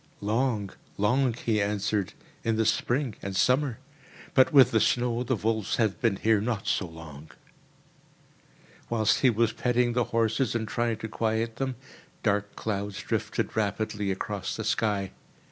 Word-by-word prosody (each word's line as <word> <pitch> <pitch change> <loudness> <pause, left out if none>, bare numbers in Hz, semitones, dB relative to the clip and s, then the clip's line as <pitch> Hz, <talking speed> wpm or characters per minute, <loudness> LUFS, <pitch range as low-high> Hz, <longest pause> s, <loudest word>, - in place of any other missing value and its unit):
"Long, 105 -1 0 0.3
long," 120 +4 +2
he 110 -3 0
answered, 100 -1 -1 0.3
"in 115 -1 +1
the 110 0 +1
spring 120 +3 0
and 100 -1 -5
summer; 125 +4 +2 0.6
but 130 +3 +5
with 135 -5 +7
the 110 - +3
snow 120 +1 +1
the 125 +1 0
wolves 110 0 -1
have 110 -4 0
been 115 -5 +2
here 110 +1 +2
not 110 -2 -2
so 95 - 0
long." 80 -2 -11 1.6
Whilst 110 -2 +2
he 130 - +5
was 115 0 +1
petting 125 -1 +1
the 120 -1 +1
horses 115 +2 0
and 110 -2 -1
trying 115 0 -1
to 110 - -5
quiet 110 +1 -1
them, 130 -1 -2 0.5
dark 105 -1 0
clouds 100 -2 -3
drifted - - -2
rapidly 105 -1 -1
across 95 0 -3
the 110 - -4
sky. 105 -3 0
110 Hz, 150 wpm, -27 LUFS, 105-120 Hz, 1.6 s, with